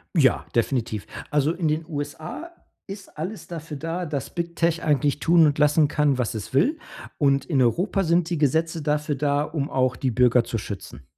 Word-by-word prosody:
Ja, 135 -7 +3
definitiv. 115 -3 0 0.2
Also 150 +1 +2
in 170 -2 -1
den 155 +1 0
USA 155 - -6 0.4
ist 195 0 -10
alles 190 +7 -5
dafür 160 -3 -7
da, 165 +4 -3
dass 140 -5 -4
Big 170 -1 -4
Tech 170 0 +1
eigentlich 145 -1 +1
tun 165 +2 +5
und 145 -1 +1
lassen 150 0 +4
kann, 145 -2 +1
was 125 -3 -1
es 110 +2 -6
will. 285 - +2 0.4
Und 140 -2 +2
in 145 -6 +1
Europa 180 - +1
sind 170 0 +2
die 170 - 0
Gesetze 160 +3 +1
dafür 150 0 0
da, 145 +1 +1
um 150 -2 -3
auch 130 -1 +1
die 130 - -1
Bürger 125 0 +4
zu 115 0 -3
schützen. 100 - -7
150 Hz, 190 wpm, -24 LUFS, 135-165 Hz, 0.4 s, tun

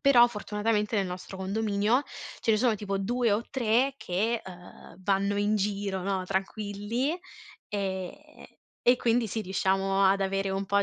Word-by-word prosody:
Però 250 -4 +7
fortunatamente 210 -1 -1
nel 195 -2 +1
nostro 180 +1 -7
condominio 205 +5 +1 0.4
ce - - +1
ne - - +4
sono 230 0 +3
tipo 200 -1 -3
2 235 +2 +1
o 215 +3 +1
3 255 +1 +2
che, 220 +5 -1
uhm, 180 -1 -12
vanno 200 +1 +1
in 205 +1 +2
giro, 200 -2 -1
no, 190 -1 -1
tranquilli, 205 - -2 0.5
ehm, 190 -3 -2 0.7
e 245 +1 +5
quindi 235 -1 +2
sì, 220 +2 -3
riusciamo 195 +1 +1
ad 195 +1 +4
avere 195 0 0
un 195 +1 -1
po' 200 +1 +3
205 Hz, 155 wpm, -28 LUFS, 195-225 Hz, 0.7 s, Però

